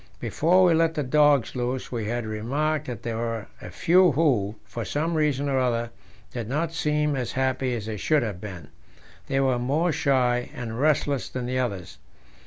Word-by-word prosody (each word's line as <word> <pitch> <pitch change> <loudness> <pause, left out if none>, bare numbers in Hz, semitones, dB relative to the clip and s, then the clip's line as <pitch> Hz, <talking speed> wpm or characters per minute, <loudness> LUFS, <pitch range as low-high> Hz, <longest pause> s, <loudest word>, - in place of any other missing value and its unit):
Before 165 - +3
we 175 -2 +5
let 165 0 +2
the 150 - -1
dogs 145 -2 +3
loose 125 +1 -3
we 115 -3 -3
had 120 +1 -2
remarked 140 +8 -1
that 125 -2 -6
there 115 -1 -3
were 115 -2 -3 0.2
a - - -8
few 175 - +4
who, 120 -9 +1
for 110 +3 -5
some 150 - -1
reason 150 -3 +1
or 135 -1 +1
other, 120 -2 0 0.4
did 120 -3 -4
not 160 +4 -1
seem 150 -2 0
as 125 -3 -3
happy 130 -1 0
as 110 -3 -5
they 110 -1 -4
should 150 +6 +2
have 100 -5 -5
been: 90 -8 -8 0.6
they 135 - 0
were 130 -2 +2
more 150 +8 +1
shy 130 -5 +1
and 115 -1 -5
restless 140 -6 +1
than 125 -1 -4
the 130 +1 -1
others. 100 -8 -4
130 Hz, 190 wpm, -25 LUFS, 115-150 Hz, 0.6 s, we